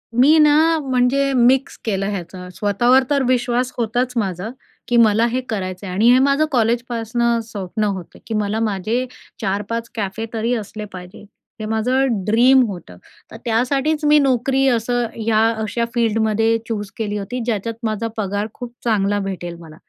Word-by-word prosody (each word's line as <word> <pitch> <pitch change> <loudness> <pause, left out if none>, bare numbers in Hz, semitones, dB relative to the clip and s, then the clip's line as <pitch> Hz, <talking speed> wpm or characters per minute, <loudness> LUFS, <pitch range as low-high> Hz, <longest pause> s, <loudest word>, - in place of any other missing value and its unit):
मी 280 +6 +6
ना, 310 +2 +4
म्हणजे 270 0 +1
मिक्स 255 +2 +3
केलं 195 -2 -1
ह्याचं 180 -2 -6
स्वतःवर 240 +7 +3
तर 280 -2 +2
विश्वास 250 0 +1
होताच 245 +2 -1
माझा, 195 -2 -2 0.4
की 240 - +2
मला 225 0 +5
हे 250 +2 -1
करायचंय 185 -2 -4
आणि 205 +6 +3
हे 255 - +6
माझं 280 +2 +3
कॉलेजपासनं 235 -1 0
स्वप्न 215 -1 -4
होतं, 195 -4 -4
की 225 - -4
मला 210 0 -1
माझे 220 +3 -1 0.4
4-5 210 +3 -2
कॅफे 210 0 -3
तरी 230 +2 0
असले 215 -1 -6
पाहिजे. 180 -1 -10 0.4
हे 215 - -4
माझं 225 0 0
ड्रीम 245 +5 +5
होतं 175 - -8 0.3
तर - - -9
त्यासाठीच 270 +7 0
मी 300 0 +6
नोकरी 270 0 +2
असं 245 0 0
ह्या 220 -1 +1 0.2
अशा 230 +2 -1
फिल्डमध्ये 225 -1 +1
चूज 210 -3 -3
केली 210 -2 -2
होती 215 +5 -4
ज्याच्यात 230 -1 -2
माझा 220 0 -1
पगार 205 0 -2
खूप 245 -1 -8
चांगला 205 -3 +1
भेटेल 185 -3 -5
मला 160 -2 -13
225 Hz, 155 wpm, -20 LUFS, 205-250 Hz, 0.4 s, मी